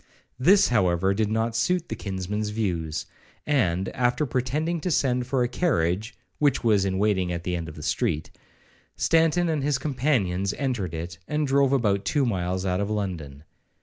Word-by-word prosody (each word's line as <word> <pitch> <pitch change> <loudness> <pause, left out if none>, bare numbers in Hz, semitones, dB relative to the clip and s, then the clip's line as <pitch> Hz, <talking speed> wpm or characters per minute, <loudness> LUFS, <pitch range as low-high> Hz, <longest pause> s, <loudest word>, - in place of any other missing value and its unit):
This, 185 +10 +5
however, 95 -4 +2
did 105 +1 0
not 110 +1 0
suit 180 +7 +1
the - - -4
kinsman's 100 +2 -3
views; 85 -8 -2 0.4
and, 95 - +1
after 125 +3 0
pretending 150 +7 -1
to 180 - -2
send 125 -5 +1
for 130 -1 +1
a - - +1
carriage, 110 - 0 0.2
(which 145 -3 +2
was 105 -4 +3
in 95 -1 -1
waiting 95 -3 +1
at 85 -1 -3
the 90 0 -1
end 85 -2 -4
of 80 - -11
the 75 - -9
street), 75 +2 -1 0.6
Stanton 165 +1 +3
and 155 -3 0
his 140 -1 +1
companions 120 -9 0
entered 115 - -2
it, 85 +1 -6
and 150 0 0
drove 135 -1 +3
about 105 -7 +2
two 140 +6 +1
miles 95 -3 -1
out 90 -1 0
of 100 0 -1
London. 85 -9 -4
110 Hz, 175 wpm, -25 LUFS, 90-135 Hz, 0.6 s, This